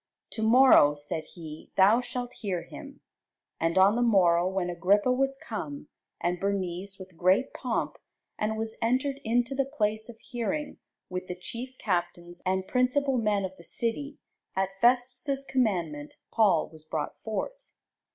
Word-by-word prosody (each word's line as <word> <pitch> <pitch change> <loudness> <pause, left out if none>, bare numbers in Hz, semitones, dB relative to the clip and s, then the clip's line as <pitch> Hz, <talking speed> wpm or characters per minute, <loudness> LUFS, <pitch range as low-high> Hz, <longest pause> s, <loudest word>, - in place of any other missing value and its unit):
To 220 - -4
morrow, 220 - +7
said 150 +2 -3
he, 160 -3 -9
thou 205 +5 +6
shalt 245 0 -5
hear 185 -6 -2
him. - - -11 0.6
And 165 +2 0
on 195 +3 +6
the 240 - +1
morrow, 180 -7 +4
when 190 -1 -1
Agrippa 190 +7 +2
was 270 +1 +1
come, 150 - -6 0.3
and 175 0 -1
Bernice, 195 0 -2
with 185 -2 -12
great 185 +9 +2
pomp, 245 -4 -2 0.4
and 215 +1 -1
was 220 0 -3
entered 260 +4 +1
into 240 +3 +1
the 275 0 +1
place 215 +1 0
of 230 - -10
hearing, 260 +6 -4 0.3
with 185 0 -5
the 180 - -4
chief 245 +8 -7
captains, 175 -2 -3
and 190 0 0
principal 255 +1 +2
men 210 -3 +1
of 190 0 -7
the 170 - -14
city, 235 - -2 0.4
at 190 0 +1
Festus' 255 +3 +2
commandment 170 - -1
Paul 200 -8 +3
was 155 -1 -14
brought 155 -1 -3
forth. - - -3
210 Hz, 150 wpm, -28 LUFS, 180-245 Hz, 0.6 s, morrow